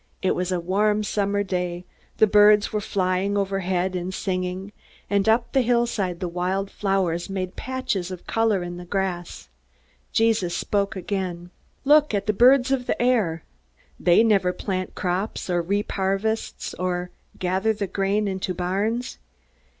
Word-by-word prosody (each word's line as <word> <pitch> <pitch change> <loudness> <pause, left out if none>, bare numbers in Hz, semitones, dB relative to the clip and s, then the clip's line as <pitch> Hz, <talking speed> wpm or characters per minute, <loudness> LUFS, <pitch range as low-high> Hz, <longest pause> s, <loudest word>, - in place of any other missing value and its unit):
It 190 - +3
was 180 +1 -2
a 180 - 0
warm 210 +4 +1
summer 205 0 0
day. 180 -2 -3 0.3
The - - +6
birds 210 0 +5
were 210 - 0
flying 190 +1 0
overhead, 190 -2 -1
and 180 +1 -3
singing; 185 +1 -3 0.4
and 200 +1 +2
up 235 +2 +2
the 270 - +3
hillside 235 -7 0
the 180 - -2
wild 185 +3 -2
flowers 190 -3 -1
made 185 -2 -4
patches 255 -9 -3
of 185 -2 -8
color 225 -5 +1
in 175 0 -6
the 175 - -8
grass. 180 -2 -3 0.6
Jesus 220 -6 +2
spoke 200 -1 -1
again: 180 -2 -4 0.3
"Look 295 -4 +5
at 200 0 -1
the 215 - +1
birds 255 +4 +5
of 255 -2 0
the - - -1
air. 215 -10 +1 0.6
They 175 +5 +5
never 200 -5 +3
plant 185 -1 -4
crops, 185 +1 -2
or 175 -1 +2
reap 200 +5 -1
harvests, 195 +3 -2
or 180 -1 -2 0.3
gather 190 +4 +1
the 205 -2 -2
grain 200 +2 0
into 190 -1 -3
barns. 200 +7 -2
195 Hz, 150 wpm, -24 LUFS, 180-210 Hz, 0.6 s, The